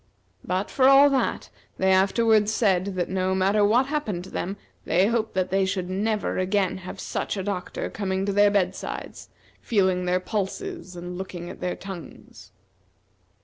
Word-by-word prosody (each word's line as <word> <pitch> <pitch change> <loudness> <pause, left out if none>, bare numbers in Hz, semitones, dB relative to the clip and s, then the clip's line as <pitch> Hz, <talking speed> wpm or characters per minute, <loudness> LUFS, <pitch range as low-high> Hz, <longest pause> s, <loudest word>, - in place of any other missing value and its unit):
But, 185 +2 -2
for 260 -1 +4
all 275 +1 +7
that, 270 - -1 0.3
they 190 0 +2
afterward 210 +3 +3
said 195 -5 +2
that 180 -1 -1
no 190 0 0
matter 195 +3 +3
what 230 +6 +4
happened 265 - -2
to 190 - -11
them, 195 +3 -3 0.3
they 180 +3 +3
hoped 225 -1 -1
that 185 -1 0
they 195 0 +2
should 185 -1 -2
never 210 +2 -1
again 190 0 +1
have 185 0 -9
such - - -3
a 190 - -2
doctor 185 -2 -3
coming 190 -2 -2
to 200 - -1
their 205 +1 +5
bed 190 -2 +1
sides, - - -7 0.3
feeling 185 -4 +1
their 180 +1 +2
pulses 210 - -4
and 175 +1 -7
looking 175 -2 -6
at - - -12
their 180 0 -2
tongues. 190 -3 -10
190 Hz, 170 wpm, -25 LUFS, 185-210 Hz, 0.3 s, all